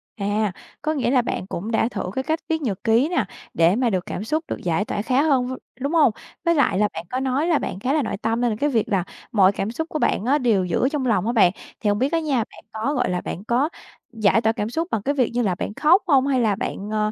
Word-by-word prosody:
À, 205 0 0 0.3
có 310 - 0
nghĩa 260 -5 0
là 260 -2 +4
bạn 210 -5 -4
cũng 205 +4 -4
đã 225 - +2
thử - - -4
cái 265 - -1
cách 315 +3 -1
viết 320 0 0
nhật 210 -10 -3
ký 235 +6 +3
nè, 355 - +1 0.3
để 170 +3 +4
mà 245 0 +2
được 185 -4 -1
cảm 200 - -4
xúc 310 +8 -1
được - - -3
giải 175 +4 0
tỏa 205 - -2
khá 255 +5 +2
hơn 270 -5 +2
v - - -4 0.3
đúng 280 +4 -1
hông? 300 -7 +5 0.3
Với 335 0 +3
lại 250 -10 +2
là 210 - +4
bạn 165 - -6
có 255 - -2
nói 265 +4 0
là 330 -4 +3
bạn 190 - -4
khá 255 +7 0
là 310 - +2
nội 220 - -3
tâm, 225 +1 0
nên 240 -1 +2
là 210 - -3
cái 295 - +2
việc 230 -6 0
là 195 -4 +1 0.3
mọi 195 -3 +5
cảm 200 +1 -3
xúc 320 +7 -4
của 310 - -3
bạn 210 - +1
á 275 +4 +3
đều 225 -9 +2
giữ 180 +9 +1
trong 290 -4 -1
lòng 210 -6 +1
á - - +2
bạn. 195 -7 +5 0.3
Thì - - -2
hông 205 0 +1
biết 265 +4 +1
á 330 - +3
nha, 300 -5 0
bạn 225 - -4
có, 225 +6 -2
gọi 250 - 0
là, 180 -1 -1
bạn 185 - -6
có 245 +7 +1 0.4
giải 220 0 +3
tỏa 220 - +3
cảm 215 -2 -3
xúc 325 +7 -2
bằng 215 - 0
cái 280 +7 -1
việc 255 -4 +2
như 245 - +1
là 195 -6 +1
bạn 205 - -4
khóc 335 - +4
hông, 275 -4 +4
hay 265 -2 +2
là 215 -3 +2
bạn, 200 0 -4
ờ, 215 0 0
235 Hz, 290 wpm, -23 LUFS, 210-280 Hz, 0.4 s, hông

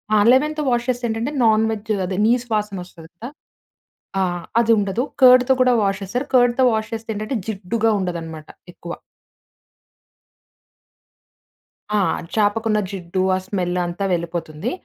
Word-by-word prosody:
ఆ! - - +5
లెమన్‌తో 300 +3 +2
వాష్ 240 0 0
చేస్తే 245 -1 -1
ఏంటంటే, 225 +6 -2
నాన్ 220 0 +4
వెజ్ 220 0 -5
అదే 185 +1 -4
నీస్‌ 245 +1 +2
వాసన 210 -1 -1
వస్తుంది 165 -2 -15
కదా! 235 +8 -8 0.9
ఆహ్ 175 -2 -2 0.2
అదుండదు. 225 0 +1 0.2
కర్డ్‌తో 255 +1 +7
కూడా 250 -1 +4
వాష్ 195 0 -1
చేస్తారు. 245 +8 -3
కర్డ్‌తో 245 +1 +4
వాష్ 220 0 -2
చేస్తే 225 0 -6
ఏంటంటే, 215 +4 -3
జిడ్డుగా 220 +2 -1
ఉండదన్నమాట 165 -4 -5 0.3
ఎక్కువ. 170 0 -8 3.0
ఆ! 210 - +2 0.4
చాపకున్న 215 +1 +1
జిడ్డు, 185 -1 -3
ఆ - - -1
స్మెల్ 180 -3 -2
అంతా 175 +3 -4
వెళ్ళిపోతుంది. 170 +2 -3
215 Hz, 130 wpm, -21 LUFS, 180-240 Hz, 3.0 s, కర్డ్‌తో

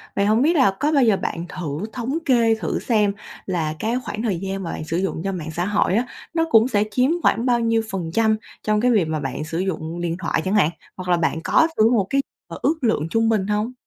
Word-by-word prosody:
Vậy 200 - +2
hổng 215 +3 +3
biết 320 +5 +3
là 260 -10 +5
có 295 +2 +1
bao 280 -4 +4
giờ 220 -4 +4
bạn 170 -2 -4
thử 160 +1 -4
thống 255 +4 -2
kê 235 -5 +4
thử 220 - -3
xem 210 -4 +1 0.3
là 165 -5 -1
cái 225 +2 -1
khoảng 215 - -5
thời 205 -7 0
gian 195 +1 -4
mà 165 - -4
bạn - - -5
sử 165 +1 -2
dụng 185 -3 -2
cho 195 - -1
mạng 165 -4 -5
xã 175 +3 -2
hội 205 -2 +1
á, 235 +3 +2 0.3
nó 325 0 +2
cũng 225 +1 +6
sẽ 205 -5 +2
chiếm 255 +6 +2
khoảng 235 - +2
bao 245 -2 +3
nhiêu 230 -1 +2
phần 175 -4 -3
trăm 220 0 +3 0.3
trong 215 0 +1
cái 250 +1 +3
việc 205 -7 +3
mà 155 -1 -2
bạn 135 +1 -4
sử 165 +2 -4
dụng 170 -2 -3
điện 170 -1 -1
thoại 170 - -1
chẳng 190 +2 0
hạn, 185 -7 +4 0.3
hoặc 185 -1 -7
là 175 - +4
bạn 165 -1 0
có 320 - +4
thử 220 +1 +5
một 205 -6 +2
cái, 275 - +2 0.3
ờ, - - -8
ước 320 - +2
lượng 220 -10 +1
trung 225 +4 +2
bình 210 -4 +1
hông? 210 +3 -1
205 Hz, 260 wpm, -22 LUFS, 175-230 Hz, 0.3 s, cũng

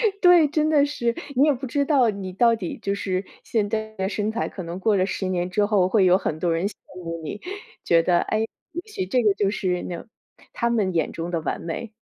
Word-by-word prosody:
对 445 -3 +3
对， 350 -4 +7
真 305 +1 +1
的 295 -2 +4
是， 235 -5 -1 0.2
你 270 - +6
也 300 - +5
不 265 0 -5
知 280 +3 +1
道 270 -6 +4
你 195 -2 -6
到 230 +4 +4
底 180 -6 -5
就 200 - 0
是 190 -1 -2 0.2
现 210 -3 0
在 220 -1 -3
的 190 -2 -2
身 210 +1 -2
材， 230 - -2
可 185 - -7
能 170 +2 -6
过 215 +1 +3
了 185 0 +2
10 190 0 -3
年 180 -1 -1
之 205 +3 +1
后， 205 -4 +3
会 200 0 +3
有 185 0 +5
很 175 -5 -2
多 175 0 +1
人 165 +3 0
羡 205 - -4 0.2
慕 165 -2 -5
你， 180 +7 -6 0.4
觉 165 -1 +4
得， 175 +1 +3
诶， 215 - -1 0.3
也 345 +2 -4
许 300 - -4
这 245 +6 +1
个 210 -3 +4
就 200 -1 0
是 180 -3 -1
那 175 - -5
种 225 - -11 0.4
他 235 - 0
们 210 -6 +1
眼 165 - 0
中 170 +1 -4
的 170 -2 -1
完 - - -2
美。 205 +7 -5
205 Hz, 265 characters per minute, -24 LUFS, 180-235 Hz, 0.4 s, 对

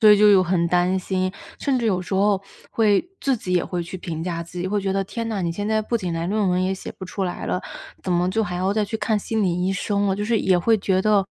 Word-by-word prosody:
所 215 -2 +8
以 210 - +8
就 210 - +7
有 195 -2 +6
很 175 -1 +1
担 180 +2 +2
心， 185 0 -1 0.3
甚 270 -3 +1
至 235 - -2
有 185 -4 +1
时 185 +2 -4
候 200 0 +3 0.3
会 220 - +2
自 270 -2 +1
己 185 -4 -4
也 175 -2 +3
会 180 -1 -3
去 170 +2 -7
评 165 -2 -5
价 170 -1 -3
自 170 +1 -9
己， 175 - -2
会 205 +2 0
觉 195 -1 -1
得， 195 0 0
天 230 +3 -4
呐， 210 -4 -2
你 170 -1 -1
现 205 +4 -3
在 220 0 +2
不 235 +2 -1
仅 180 -5 -3
来 165 +1 -2
论 205 0 +1
文 180 0 +2
也 185 +1 +1
写 190 - -7
不 190 - -7
出 190 +1 -3
来 180 - -4
了， 180 - -1 0.4
怎 185 - -3
么 175 +1 +2
就 220 +3 +1
还 180 -4 -3
要 185 +2 +1
再 215 0 +1
去 210 +2 -3
看 215 0 0
心 220 +1 -1
理 180 -1 +1
医 190 - +1
生 200 +1 0
了。 195 -1 +1
就 205 - -2
是 225 +1 +2
也 185 -3 +3
会 220 +5 +3
觉 190 -1 +1
得 205 -2 +3
190 Hz, 320 characters per minute, -23 LUFS, 180-210 Hz, 0.4 s, 所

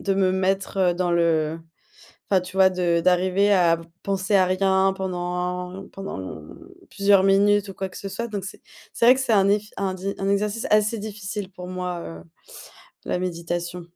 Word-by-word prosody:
de 195 - 0
me 190 -1 +2
mettre 190 -1 +1
dans 175 0 -1
le 165 -2 +1 0.7
enfin, 190 -2 +4
tu 185 +1 -10
vois 190 0 +6
de 175 -2 +1
d'arriver 185 +3 +2
à 175 -4 +4
v 165 - -11 0.2
penser 195 0 -1
à 185 -2 +5
rien 190 +1 +2
pendant 180 0 -4
pendant 195 0 -6
lon 80 -5 -9 0.3
plusieurs 200 -1 +4
minutes 200 +1 +3
ou 195 - -8
quoi 190 - -4
que 185 - -14
ce 200 - -6
soit 235 +4 -4
donc 205 -4 -5
c'est 190 - -9 0.3
c'est - - -1
vrai 250 - +8
que 265 - -3
c'est 260 -3 0
un 195 -2 +4
eff 205 +1 +2
un 195 -1 -2
di 195 +2 -4
un 195 0 -2
exercice 210 +4 0
assez 215 +1 +3
difficile 205 -1 -6
pour 180 0 -9
moi, 180 -1 -4
heu, 80 - -9 0.8
la - - -1
méditation. 175 0 -4
190 Hz, 190 wpm, -23 LUFS, 180-200 Hz, 0.8 s, vrai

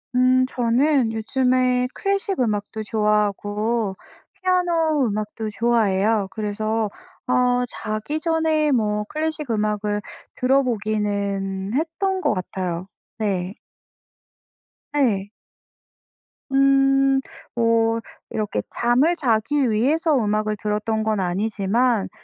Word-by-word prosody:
음 255 +1 +4
저는 250 +1 +2
요즘에 250 +2 +1
클래식 395 -1 -1
음악도 215 -2 -1
좋아하고 210 0 0 0.4
피아노 345 -6 +1
음악도 215 0 -3
좋아해요. 215 -2 +1
그래서 215 +1 -2 0.4
어 250 0 +2
자기 215 +7 -4
전에 320 -2 +1
뭐 210 -4 +1
클래식 310 -3 -3
음악을 210 -1 -1 0.4
들어보기는 205 -6 0
했던 340 +6 -1
것 - - +2
같아요. 185 -1 -4 0.3
네. 195 -3 -2 1.4
네. 215 -9 +1 1.2
음 270 0 +4 0.4
뭐 230 -1 +2 0.3
이렇게 210 -1 -2
잠을 255 +9 +2
자기 260 0 +1
위해서 295 +8 +2
음악을 215 -3 0
들었던 215 +1 -1
건 215 -1 0
아니지만 205 +4 0
225 Hz, 210 characters per minute, -22 LUFS, 210-270 Hz, 1.4 s, 음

